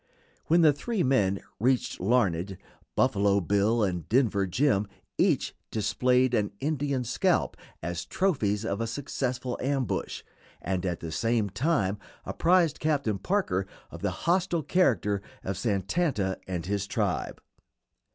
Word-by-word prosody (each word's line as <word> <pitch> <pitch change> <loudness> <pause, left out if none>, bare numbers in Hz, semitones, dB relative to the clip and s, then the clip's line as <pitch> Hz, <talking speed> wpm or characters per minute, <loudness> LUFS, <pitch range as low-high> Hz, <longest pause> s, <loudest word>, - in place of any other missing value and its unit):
When 170 +2 +5
the 155 -3 +6
three 190 +8 -2
men 100 -8 +2 0.2
reached 125 +3 +1
Larned, 95 -4 +1 0.4
Buffalo 100 -5 +3
Bill 100 +5 +2
and 90 -5 -2
Denver 110 -5 +2
Jim 105 0 +2 0.3
each - - +2 0.2
displayed 125 +3 +2
an 105 -4 +1
Indian 140 -3 -1
scalp 120 - +1 0.3
as 85 +1 -3
trophies 110 - 0
of 100 -1 -2
a 115 - -1
successful 125 -1 -3
ambush, 135 -2 -2 0.4
and 95 0 -2
at 85 -2 -3
the 80 - -5
same 115 +2 0
time 105 - 0 0.3
apprised 170 -3 +2
Captain 140 -10 0
Parker 100 - 0 0.2
of - - -9
the - - +1 0.2
hostile 175 -2 +2
character 105 - +2 0.2
of 95 - -2
Santanta 100 - 0
and 90 -3 -3
his 100 0 -2
tribe. - - -1
115 Hz, 130 wpm, -28 LUFS, 100-140 Hz, 0.4 s, the